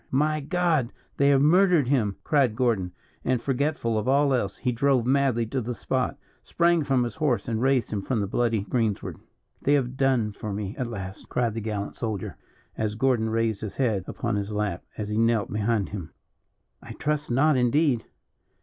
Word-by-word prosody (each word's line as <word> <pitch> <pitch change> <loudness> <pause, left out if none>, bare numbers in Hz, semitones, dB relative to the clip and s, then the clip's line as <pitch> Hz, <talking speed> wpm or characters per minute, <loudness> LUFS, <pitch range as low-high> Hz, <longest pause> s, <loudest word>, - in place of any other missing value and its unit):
"My 155 +3 +1
God! 160 -4 0 0.3
they 140 0 +4
have 140 -1 +4
murdered 175 -3 +4
him!" 115 -8 +1
cried 135 -7 +2
Gordon; 110 -7 0 0.3
and 130 -1 +1
forgetful 135 -4 0
of 105 - -4
all 140 +1 +3
else, 100 -6 0
he 125 - -1
drove 125 0 +2
madly 130 -3 +2
to 130 +4 -2
the 120 +1 -4
spot, 130 +3 -1 0.2
sprang 170 -1 +2
from 135 -3 +2
his 120 - -3
horse, 135 -10 0
and 115 -1 -1
raised 130 -3 +2
him 100 - -1
from 120 +3 -1
the 100 - 0
bloody 115 +1 0
greensward. 110 0 -2 0.4
"They 145 - +2
have 130 -2 -1
done 130 -6 +2
for 105 +1 -6
me 100 0 -4
at 125 - -3
last," 100 -4 -7
cried 120 -3 0
the 115 - -4
gallant 105 -2 -4
soldier, 110 -5 -4 0.4
as 110 -1 -2
Gordon 120 -2 +1
raised 115 -2 0
his 105 -3 -5
head 110 -8 0
upon 115 -4 -2
his 100 +1 -3
lap, 105 -4 -2
as 105 -1 -4
he 105 +1 0
knelt 115 -3 +1
behind 105 -1 0
him. 90 -6 -6 0.7
"I - - -9
trust 150 0 -2
not, 145 +5 +3
indeed." 125 0 +2
120 Hz, 185 wpm, -26 LUFS, 105-135 Hz, 0.7 s, they